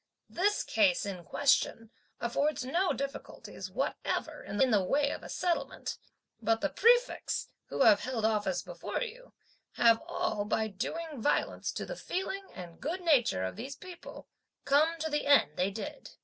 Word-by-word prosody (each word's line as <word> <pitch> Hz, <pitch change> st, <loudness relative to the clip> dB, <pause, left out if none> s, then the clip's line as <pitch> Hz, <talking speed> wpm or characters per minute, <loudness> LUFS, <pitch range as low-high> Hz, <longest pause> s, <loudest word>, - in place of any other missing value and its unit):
This 410 Hz, +4 st, +1 dB
case 280 Hz, -7 st, +2 dB
in 185 Hz, -3 st, -5 dB
question 230 Hz, -2 st, +1 dB, 0.3 s
affords 255 Hz, +3 st, 0 dB
no 350 Hz, +8 st, +1 dB
difficulties 275 Hz, +1 st, -6 dB
whatever -, -, -2 dB
in 205 Hz, -, -5 dB
the 205 Hz, -3 st, +4 dB
way 285 Hz, +9 st, +2 dB
of -, -, -5 dB
a -, -, -10 dB
settlement; 350 Hz, -2 st, -2 dB, 0.4 s
but 225 Hz, 0 st, +2 dB
the 300 Hz, -, -1 dB
prefects, 485 Hz, +3 st, +2 dB, 0.2 s
who -, -, +1 dB
have 215 Hz, -2 st, +7 dB
held 235 Hz, -2 st, -2 dB
office 205 Hz, -5 st, +1 dB
before 175 Hz, -, -4 dB
you, -, -, -9 dB, 0.4 s
have 230 Hz, -1 st, +5 dB
all, 210 Hz, -2 st, -1 dB
by 220 Hz, +1 st, 0 dB
doing 300 Hz, -, -4 dB
violence 290 Hz, -, 0 dB
to -, -, -4 dB
the -, -, -6 dB
feelings 385 Hz, -2 st, -4 dB
and 175 Hz, -3 st, -10 dB
good 350 Hz, +5 st, -2 dB
name 300 Hz, -9 st, +5 dB, 0.2 s
of 95 Hz, -, -3 dB
these 265 Hz, +5 st, -6 dB
people, 365 Hz, -1 st, -11 dB, 0.4 s
come 305 Hz, +4 st, +3 dB
to 320 Hz, -, 0 dB
the 295 Hz, -1 st, 0 dB
end 285 Hz, -, +6 dB
they 185 Hz, +2 st, +1 dB
did." 200 Hz, 0 st, -7 dB
275 Hz, 160 wpm, -31 LUFS, 215-335 Hz, 0.4 s, have